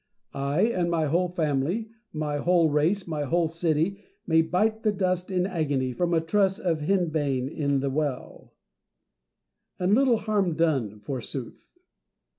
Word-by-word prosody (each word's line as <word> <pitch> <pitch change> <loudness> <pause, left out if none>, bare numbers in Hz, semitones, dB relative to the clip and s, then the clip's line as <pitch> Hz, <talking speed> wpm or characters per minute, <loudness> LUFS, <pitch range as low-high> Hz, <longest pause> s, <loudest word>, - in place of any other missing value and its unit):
I, 140 +5 -1
and 185 -7 +1
my 165 -2 +1
whole 170 +5 +1
family, 170 +6 -1 0.2
my 150 -2 -2
whole 170 +1 +3
race, 165 +7 +1
my 155 -3 -3
whole 165 +4 +1
city, 165 +3 0 0.3
may 160 -1 +4
bite 215 +7 0
the 215 - +2
dust 185 -2 -1
in 180 -1 0
agony 145 -8 -1
from 175 +7 -1
a 165 - +3
truss 190 +4 +1
of 175 -7 -1
henbane 150 -6 0
in 140 -2 -1
the 140 0 -1
well; 145 -2 -4 1.2
and 185 +2 +1
little 255 0 +4
harm 205 -6 0
done 135 -11 0
forsooth 130 - -6
165 Hz, 145 wpm, -26 LUFS, 145-185 Hz, 1.2 s, may